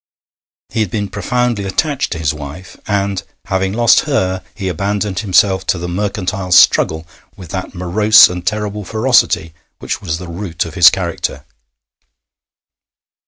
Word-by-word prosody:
He 110 Hz, -, -4 dB
had 105 Hz, -4 st, 0 dB
been 100 Hz, 0 st, -3 dB
profoundly 120 Hz, +1 st, -1 dB
attached 140 Hz, +9 st, -1 dB
to -, -, -5 dB
his 80 Hz, -2 st, -1 dB
wife, 75 Hz, +5 st, -9 dB
and, 100 Hz, -2 st, -1 dB, 0.2 s
having 95 Hz, -1 st, -1 dB
lost 120 Hz, +2 st, +4 dB
her 95 Hz, -9 st, 0 dB
he 100 Hz, -2 st, -4 dB
abandoned 100 Hz, +2 st, -2 dB
himself 95 Hz, -1 st, +2 dB
to -, -, +1 dB
the 85 Hz, +1 st, -5 dB
mercantile 95 Hz, 0 st, -3 dB
struggle 80 Hz, -2 st, +4 dB, 0.3 s
with 90 Hz, -4 st, -11 dB
that 95 Hz, 0 st, -5 dB
morose 105 Hz, +5 st, +5 dB
and 90 Hz, 0 st, -6 dB
terrible 105 Hz, +1 st, -3 dB
ferocity 110 Hz, -7 st, +1 dB, 0.2 s
which -, -, -5 dB
was 80 Hz, -5 st, -3 dB
the 90 Hz, 0 st, -9 dB
root 85 Hz, -1 st, -4 dB
of -, -, -8 dB
his -, -, +7 dB
character. -, -, -4 dB
95 Hz, 145 wpm, -16 LUFS, 90-105 Hz, 0.3 s, his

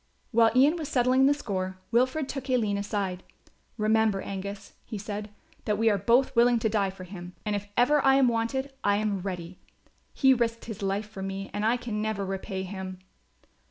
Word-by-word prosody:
While 230 Hz, -1 st, +5 dB
Ian 285 Hz, +6 st, +5 dB
was 310 Hz, -4 st, -5 dB
settling 255 Hz, +1 st, +4 dB
the 285 Hz, -, +5 dB
score 190 Hz, -8 st, -3 dB
Wilfred 255 Hz, +5 st, +2 dB
took 270 Hz, -1 st, -6 dB
Aline 215 Hz, -6 st, +1 dB
aside: 200 Hz, -3 st, -2 dB, 0.6 s
"Remember, 215 Hz, -2 st, +2 dB
Angus," 200 Hz, +1 st, -6 dB
he 215 Hz, -, -6 dB
said, 205 Hz, +1 st, -5 dB, 0.4 s
"that 210 Hz, -1 st, +1 dB
we 225 Hz, +1 st, +3 dB
are 205 Hz, -, +2 dB
both 245 Hz, +6 st, +3 dB
willing 240 Hz, +1 st, +5 dB
to 225 Hz, -1 st, 0 dB
die 205 Hz, -2 st, +1 dB
for 190 Hz, -1 st, -10 dB
him; 180 Hz, -1 st, -9 dB
and 210 Hz, -1 st, 0 dB
if 205 Hz, 0 st, -4 dB
ever 285 Hz, +4 st, +4 dB
I 270 Hz, 0 st, +5 dB
am 270 Hz, -2 st, +5 dB
wanted 245 Hz, +4 st, -1 dB
I 205 Hz, 0 st, +3 dB
am 210 Hz, -2 st, 0 dB
ready. 180 Hz, -2 st, -6 dB, 0.5 s
He 265 Hz, -1 st, +4 dB
risked 230 Hz, -2 st, -1 dB
his 220 Hz, -2 st, -7 dB
life 200 Hz, +2 st, -1 dB
for 210 Hz, -2 st, -9 dB
me 195 Hz, 0 st, -5 dB
and 205 Hz, -, -2 dB
I 230 Hz, +3 st, +3 dB
can 230 Hz, -3 st, -4 dB
never 215 Hz, -2 st, -2 dB
repay 190 Hz, 0 st, -4 dB
him." 190 Hz, -1 st, -6 dB
215 Hz, 195 wpm, -27 LUFS, 195-245 Hz, 0.6 s, While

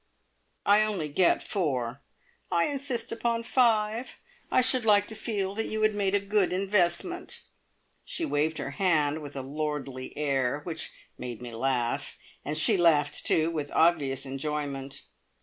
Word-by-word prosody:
"I 205 Hz, +1 st, +6 dB
only 200 Hz, -8 st, -1 dB
get 170 Hz, +5 st, +3 dB
four." 130 Hz, -, -2 dB, 0.5 s
"I 170 Hz, -, +3 dB
insist 270 Hz, -5 st, -2 dB
upon 230 Hz, 0 st, -1 dB
five! 230 Hz, -1 st, +1 dB, 0.3 s
I -, -, +4 dB
should 255 Hz, -1 st, +3 dB
like 205 Hz, -2 st, +5 dB
to 220 Hz, -, -5 dB
feel 205 Hz, -3 st, -2 dB
that 225 Hz, +2 st, -2 dB
you 215 Hz, 0 st, -2 dB
had 215 Hz, 0 st, +4 dB
made 200 Hz, -1 st, +1 dB
a -, -, +4 dB
good 200 Hz, -1 st, +1 dB
investment." 195 Hz, -, 0 dB, 0.6 s
She 430 Hz, -10 st, -2 dB
waved 155 Hz, -, 0 dB
her -, -, -4 dB
hand 155 Hz, -4 st, +1 dB
with 145 Hz, -1 st, -9 dB
a 135 Hz, -, -4 dB
lordly 140 Hz, -2 st, -4 dB
air 140 Hz, -1 st, 0 dB
which 160 Hz, -1 st, -3 dB, 0.3 s
made 120 Hz, -3 st, -6 dB
me 120 Hz, -1 st, -8 dB
laugh. 120 Hz, 0 st, -1 dB, 0.3 s
And 150 Hz, +2 st, -2 dB
she 155 Hz, +4 st, +5 dB
laughed, 150 Hz, -4 st, +3 dB
too, 160 Hz, +1 st, +3 dB
with 150 Hz, -3 st, -3 dB
obvious 145 Hz, -5 st, +2 dB
enjoyment. 135 Hz, 0 st, -4 dB
165 Hz, 150 wpm, -28 LUFS, 145-210 Hz, 0.6 s, I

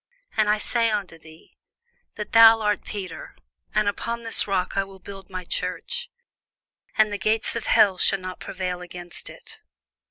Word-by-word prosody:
And 215 Hz, -1 st, +3 dB
I 210 Hz, -, +4 dB
say 230 Hz, +2 st, +1 dB
also 215 Hz, -, +2 dB
unto 165 Hz, -4 st, -15 dB
thee, 160 Hz, 0 st, -18 dB, 0.6 s
That 210 Hz, -, -6 dB
thou 225 Hz, -1 st, +8 dB
art 210 Hz, -1 st, 0 dB
Peter, 210 Hz, -, -7 dB, 0.4 s
and 215 Hz, -1 st, +2 dB
upon 235 Hz, +3 st, -2 dB
this 225 Hz, -2 st, +2 dB
rock 190 Hz, -2 st, -1 dB
I 195 Hz, -, +2 dB
will 195 Hz, 0 st, -13 dB
build 195 Hz, 0 st, -11 dB
my 185 Hz, -1 st, -5 dB
church; 485 Hz, -, -3 dB, 0.9 s
and 215 Hz, -1 st, +4 dB
the 205 Hz, -, -3 dB
gates 215 Hz, +5 st, 0 dB
of 230 Hz, -, -4 dB
hell 190 Hz, -3 st, +5 dB
shall 195 Hz, -, +4 dB
not 185 Hz, 0 st, -7 dB
prevail 180 Hz, -2 st, -4 dB
against 175 Hz, 0 st, -9 dB
it. -, -, -13 dB
205 Hz, 170 wpm, -24 LUFS, 185-220 Hz, 0.9 s, thou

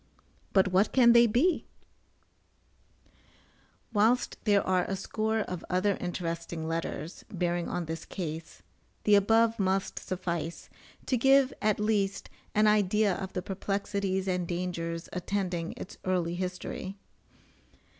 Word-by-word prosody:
but 190 Hz, -2 st, +4 dB
what 190 Hz, +3 st, +3 dB
can 240 Hz, -3 st, +7 dB
they 235 Hz, 0 st, +7 dB
be? 275 Hz, +11 st, +2 dB, 2.3 s
Whilst 225 Hz, +4 st, +3 dB
there 205 Hz, -2 st, +3 dB
are 185 Hz, -1 st, +2 dB
a 195 Hz, -, -2 dB
score 220 Hz, +3 st, -1 dB
of 180 Hz, -4 st, -5 dB
other 185 Hz, +2 st, +2 dB
interesting 170 Hz, -2 st, -4 dB
letters, 165 Hz, 0 st, -4 dB
bearing 175 Hz, -2 st, -1 dB
on 175 Hz, -, -2 dB
this 160 Hz, 0 st, -5 dB
case, 160 Hz, -2 st, -6 dB, 0.4 s
the 210 Hz, -, +4 dB
above 225 Hz, +3 st, +4 dB
must 190 Hz, 0 st, 0 dB
suffice, 170 Hz, -3 st, -4 dB, 0.3 s
to 255 Hz, -, +1 dB
give 270 Hz, +2 st, +5 dB
at 215 Hz, -1 st, +2 dB
least, 205 Hz, -2 st, 0 dB, 0.2 s
an 215 Hz, +1 st, +5 dB
idea 210 Hz, -1 st, +3 dB
of 190 Hz, +1 st, -5 dB
the 180 Hz, -, -3 dB
perplexities 195 Hz, -1 st, -2 dB
and 180 Hz, -2 st, 0 dB
dangers 170 Hz, -1 st, -3 dB
attending 180 Hz, -2 st, -2 dB
its 210 Hz, -, -9 dB
early 180 Hz, -2 st, 0 dB
history. 185 Hz, +2 st, -4 dB
190 Hz, 125 wpm, -29 LUFS, 175-210 Hz, 2.3 s, can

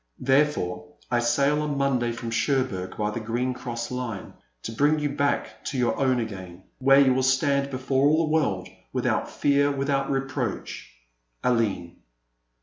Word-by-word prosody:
Therefore 130 Hz, -11 st, +1 dB, 0.2 s
I 120 Hz, -, +3 dB
sail 140 Hz, +5 st, +2 dB
on 150 Hz, -2 st, -2 dB
Monday 130 Hz, -4 st, +1 dB
from 115 Hz, 0 st, -5 dB
Cher 135 Hz, +3 st, +2 dB
bourg 95 Hz, -7 st, -6 dB
by 105 Hz, 0 st, 0 dB
the 115 Hz, -, -4 dB
Green 120 Hz, +3 st, -1 dB
Cross 120 Hz, -1 st, -5 dB
Wne, 120 Hz, -6 st, -5 dB, 0.3 s
to -, -, -4 dB
bring 145 Hz, +7 st, +2 dB
you 150 Hz, -1 st, -1 dB
back 140 Hz, 0 st, -1 dB
to 140 Hz, -, -3 dB
your 120 Hz, -2 st, +1 dB
own 130 Hz, -2 st, +2 dB
again, 95 Hz, -5 st, -6 dB, 0.2 s
where 135 Hz, +1 st, +6 dB
you 135 Hz, -2 st, +5 dB
will 130 Hz, -, +1 dB
stand 140 Hz, +1 st, +2 dB
before 135 Hz, +1 st, +1 dB
all 160 Hz, +2 st, +3 dB
the 155 Hz, -, -3 dB
world, 95 Hz, -, +1 dB, 0.2 s
without -, -, 0 dB
fear, 145 Hz, 0 st, +2 dB
without 135 Hz, 0 st, 0 dB
reproach,'* 135 Hz, -4 st, -3 dB, 0.5 s
AWNB. 110 Hz, -8 st, 0 dB
130 Hz, 160 wpm, -25 LUFS, 115-140 Hz, 0.5 s, where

